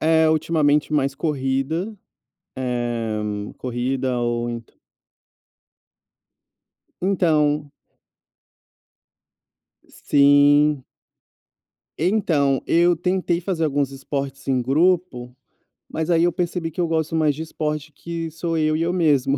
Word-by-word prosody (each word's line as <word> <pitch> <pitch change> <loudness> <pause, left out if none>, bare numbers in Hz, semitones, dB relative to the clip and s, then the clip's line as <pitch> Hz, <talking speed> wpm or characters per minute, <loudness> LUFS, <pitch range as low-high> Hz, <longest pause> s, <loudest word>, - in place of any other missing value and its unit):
É 160 0 +4
ultimamente 155 -2 +1
mais 140 -1 +1
corrida, 150 +7 -2 0.6
eh, 120 -4 -2 0.4
corrida 125 +1 -2
ou 120 0 -1
ent 115 -1 -7 2.3
Então 150 -6 +1 2.2
Sim. 145 0 +4 1.1
Então, 155 -7 +1
eu 175 +1 +4
tentei 180 0 -1
fazer 175 -2 -1
alguns 145 -2 0
esportes 135 0 -5
em 130 -2 +2
grupo, 140 -2 +1 0.6
mas 160 +1 -3
aí 170 -1 +4
eu 175 - +2
percebi 175 -1 -2
que 165 - -4
eu 170 - +1
gosto 160 -1 -1
mais 155 -2 +2
de 150 - -7
esporte 155 -1 -4
que 165 -1 -5
sou 165 +1 -3
eu 155 -1 +1
e 160 - -1
eu 170 +1 +1
mesmo. 145 -6 +2
150 Hz, 105 wpm, -22 LUFS, 135-165 Hz, 2.3 s, É